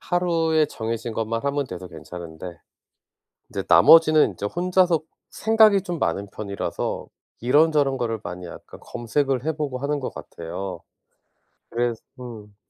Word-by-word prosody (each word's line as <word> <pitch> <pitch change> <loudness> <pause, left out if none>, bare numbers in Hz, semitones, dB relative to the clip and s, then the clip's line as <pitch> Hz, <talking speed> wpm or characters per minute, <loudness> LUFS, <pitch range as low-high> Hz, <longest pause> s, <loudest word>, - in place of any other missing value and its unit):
하루에 165 -3 +1
정해진 115 -2 -4
것만 115 +2 -2
하면 140 -1 0
돼서 90 -2 -8
괜찮은데 85 +1 -9 0.9
인제 - - -4
나머지는 155 -2 +7
인제 100 - -5
혼자서 180 - +2 0.3
생각이 220 -3 +4
좀 175 -4 -4
많은 100 -5 -1
편이라서 100 -2 -4 0.3
이런저런 145 +1 +3
거를 115 -2 -1
많이 90 0 -6
약간 - - -12
검색을 135 +2 -1
해보고 150 -5 -2
하는 145 +2 -1
것 130 - -4
같아요. 90 +3 -7 0.9
그래서 120 -1 -1 0.2
음 110 -4 -9
125 Hz, 300 characters per minute, -24 LUFS, 105-160 Hz, 0.9 s, 나머지는